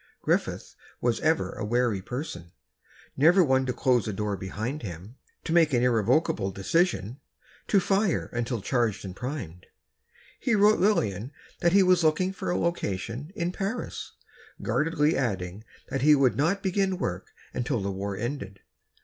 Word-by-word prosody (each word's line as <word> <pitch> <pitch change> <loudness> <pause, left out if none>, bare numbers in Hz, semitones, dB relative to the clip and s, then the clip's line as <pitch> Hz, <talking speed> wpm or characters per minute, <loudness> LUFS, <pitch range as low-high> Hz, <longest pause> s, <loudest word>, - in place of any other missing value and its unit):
Griffith - - -1 0.3
was 120 -2 0
ever 160 +1 +1
a 110 - -6
wary 115 -2 +1
person. 95 - -6 0.6
Never 170 +7 +6
one 130 -3 +2
to - - +1
close 125 -3 +1
a 110 - -2
door 105 +1 -2
behind 110 - -4
him... 100 +4 -8 0.3
to 165 - -2
make 165 -4 +4
an 120 -1 +3
irrevocable 120 -1 +2
decision, 125 - 0 0.5
to 200 - +4
fire 195 0 +1
until 120 -1 -2
charged 115 -3 0
and 90 -1 -7
primed. 125 - -6 0.7
He 235 - +1
wrote 210 +1 +5
Lillian 120 - +1 0.3
that 170 0 +2
he 195 0 +6
was 180 -2 +4
looking 170 +4 +2
for - - -4
a 175 - +1
location 125 - -2
in 175 -3 -1
Paris, 200 +6 -4 0.5
guardedly 155 0 +1
adding 100 -5 -2 0.3
that 135 - -2
he 150 +2 +6
would 130 -5 +3
not 170 - +1
begin 190 0 +1
work 95 - -3 0.3
until 125 0 -1
the 100 0 -2
war 100 +1 -4
ended. 105 -4 -5
130 Hz, 155 wpm, -27 LUFS, 105-170 Hz, 0.7 s, Never